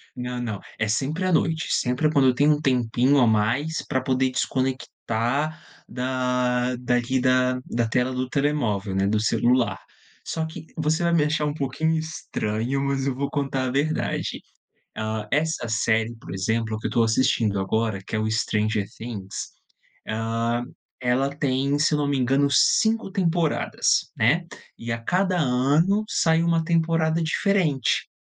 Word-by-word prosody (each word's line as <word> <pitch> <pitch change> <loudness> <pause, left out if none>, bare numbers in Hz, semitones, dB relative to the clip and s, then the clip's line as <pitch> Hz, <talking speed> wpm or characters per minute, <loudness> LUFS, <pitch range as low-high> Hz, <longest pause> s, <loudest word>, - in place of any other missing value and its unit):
Não, 125 0 -4
não, 110 -5 -4 0.2
é 110 - +1
sempre 145 - -1
à 185 - +1
noite, 160 -1 +1
sempre 125 +5 +1
quando 140 -3 +4
eu 130 - +4
tenho 145 +3 +4
um 150 - -3
tempinho 130 0 +2
a 125 - +5
mais, 115 +9 +1
pra 130 - 0
poder 130 0 +1
desconectar 130 +2 -2 0.3
da 125 -1 0
daqui 125 +1 0
da 130 0 +2
da 120 -1 -1
tela 125 +3 0
do 130 0 -2
telemóvel, 120 -10 0
né, 95 0 +1
do 105 +1 +1
celular. 120 +3 +1 0.4
Só 160 -1 -3
que, 160 0 -9
você 160 +2 0
vai 170 0 +2
me 165 -3 +4
achar 150 0 0
um 145 - -1
pouquinho 155 +3 -1
estranho, 135 -5 -3
mas 140 -1 -1
eu 135 - -1
vou 140 +2 -2
contar 135 -2 -1
a - - -2
verdade. 145 +4 -1 0.5
Ah, 110 0 -3
essa 155 -4 0
série, 115 +1 +1
por 100 -6 -10
exemplo, 110 +3 -1
que - - -3
eu - - -4
estou 115 - +2
assistindo 110 -3 +1
agora, 110 +1 -1
que - - -4
é - - 0
o 110 0 -1
Stranger 110 -1 0
Things, 105 -5 -6 0.6
ah, 115 +2 -1 0.4
ela 130 +2 +1
tem, 140 0 0
se 155 +1 +2
eu - - +3
não 145 - 0
me 140 -1 0
engano, 135 +3 +2
5 220 +7 +3
temporadas, 175 -5 +1
né, 155 +11 +2 0.3
e 115 0 -5
a 115 - -1
cada 180 +9 0
ano, 150 +9 +2
sai 160 0 +2
uma 165 -1 +2
temporada 165 -1 +1
diferente. 165 - +1
130 Hz, 160 wpm, -24 LUFS, 115-155 Hz, 0.6 s, a